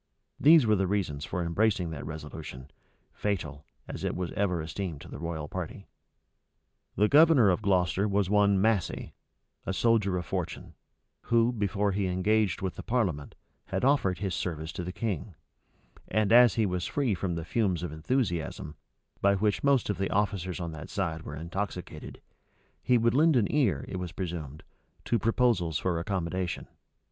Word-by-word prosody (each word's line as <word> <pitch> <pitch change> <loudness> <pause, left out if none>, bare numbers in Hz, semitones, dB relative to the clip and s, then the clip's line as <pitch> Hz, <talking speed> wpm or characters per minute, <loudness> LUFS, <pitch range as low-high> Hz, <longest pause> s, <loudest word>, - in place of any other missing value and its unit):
These 155 -2 +7
were 110 -1 +4
the 95 -1 +1
reasons 90 -8 -1
for 90 -2 -3
embracing 90 0 +1
that 80 - -6
resolution, 75 -3 -8 0.4
fatal, 75 -8 -3 0.2
as - - -7
it - - -1
was 90 -1 -3
ever 90 -4 0
esteemed 80 0 -4
to - - -11
the - - -8
royal 85 -3 -4
party.[*] 90 +3 -6 1.1
The 105 - +3
governor 145 -6 +6
of 90 - 0
Gloucester 95 0 +2
was 100 -1 +1
one 100 -1 +3
Massey, 105 -2 0 0.5
a 95 - -3
soldier 105 -3 +2
of 90 - -4
fortune, - - -4 0.5
who, 115 +1 +3
before 100 -2 0
he 100 0 0
engaged 100 +3 +1
with 95 - -3
the - - -5
parliament, 95 - -1 0.3
had - - -2
offered 130 -10 +2
his 95 0 -3
service 80 -2 -3
to 90 - -5
the 90 - -4
king; 100 -3 -4 0.7
and 110 -1 +1
as 120 -2 +7
he 110 - +2
was 90 -2 -2
free 135 -7 0
from 90 -2 -2
the 80 -1 -4
fumes 95 -3 0
of 85 - -4
enthusiasm, 80 - -2 0.5
by 100 0 +4
which 105 +1 0
most 140 -4 +3
of 105 -3 -2
the 95 - 0
officers 95 -3 -1
on 85 -2 -4
that 75 -2 -8
side 85 -5 -2
were 75 - -7
intoxicated, 90 +3 -5 0.6
he 125 - +3
would 115 0 +2
lend 155 +3 +4
an 115 -5 +4
ear, 110 - +2
it - - -5
was 90 -2 -5
presumed, 80 -6 -5 0.4
to 115 - +1
proposals 110 -7 +2
for 90 -3 -1
accommodation. 90 -1 -3
95 Hz, 170 wpm, -29 LUFS, 85-110 Hz, 1.1 s, These